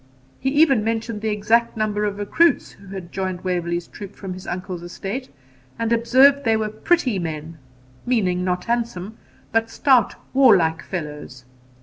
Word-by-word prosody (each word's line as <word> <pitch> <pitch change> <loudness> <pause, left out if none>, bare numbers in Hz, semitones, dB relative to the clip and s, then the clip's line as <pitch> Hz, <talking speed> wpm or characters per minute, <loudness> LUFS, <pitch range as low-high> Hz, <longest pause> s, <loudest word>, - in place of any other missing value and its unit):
He 265 - 0
even 280 -5 +4
mentioned 225 -1 -2
the 220 - -1
exact 220 +3 +1
number 210 -1 0
of 205 -1 -2
recruits 325 +12 +2
who 200 - -17
had 185 -3 -8
joined 185 -2 -3
Waverley's 175 -2 -1
troop 200 +2 -10
from 190 -2 -6
his 185 0 -10
uncle's 180 -1 -5
estate, 195 +8 -6 0.5
and 230 0 0
observed 260 +5 +5
they 225 -1 +3
were 215 -1 -1
PRETTY 245 - +1
MEN, 160 -1 -5 0.4
meaning, 190 -8 +1
not 180 -1 -1
handsome, 230 -4 -3 0.3
but 225 0 +1
stout 255 -3 +3 0.2
warlike 195 -12 +5
fellows. 150 -7 -7
210 Hz, 150 wpm, -22 LUFS, 180-235 Hz, 0.5 s, observed